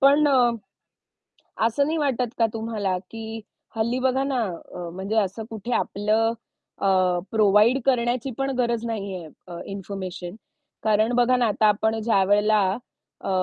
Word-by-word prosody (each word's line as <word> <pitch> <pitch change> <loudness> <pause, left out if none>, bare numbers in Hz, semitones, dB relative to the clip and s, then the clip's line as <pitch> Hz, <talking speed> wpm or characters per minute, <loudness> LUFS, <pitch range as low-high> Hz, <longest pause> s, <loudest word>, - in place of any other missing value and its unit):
पण 285 +2 +5
अ, 250 -3 +4 1.2
असं 230 +5 +2
नाही 315 +3 -1
वाटत 255 -5 0
का 230 - +4
तुम्हाला 220 -4 -2
की 225 0 -6 0.3
हल्ली 235 +3 0
बघा 260 +1 +1
ना 270 -3 0 0.3
अ, 175 -1 -5
म्हणजे 190 +4 -4
असं 200 +2 0
कुठे 225 +2 -6
आपलं 215 +3 +1 0.5
अ, - - 0 0.5
प्रोव्हाईड 215 +4 +4
करण्याची 250 0 +1
पण 270 0 -1
गरज 235 -2 0
नाहीये 195 -7 -4 0.2
अ, 175 -1 -7
इन्फॉर्मेशन. 190 -2 -6 0.5
कारण 215 +1 +3
बघा 245 +1 +4
ना 245 - +2
आता 215 0 +1
आपण 220 +2 +1
ज्यावेळेला 210 0 +3 0.6
अ, - - -3
225 Hz, 140 wpm, -24 LUFS, 205-245 Hz, 1.2 s, पण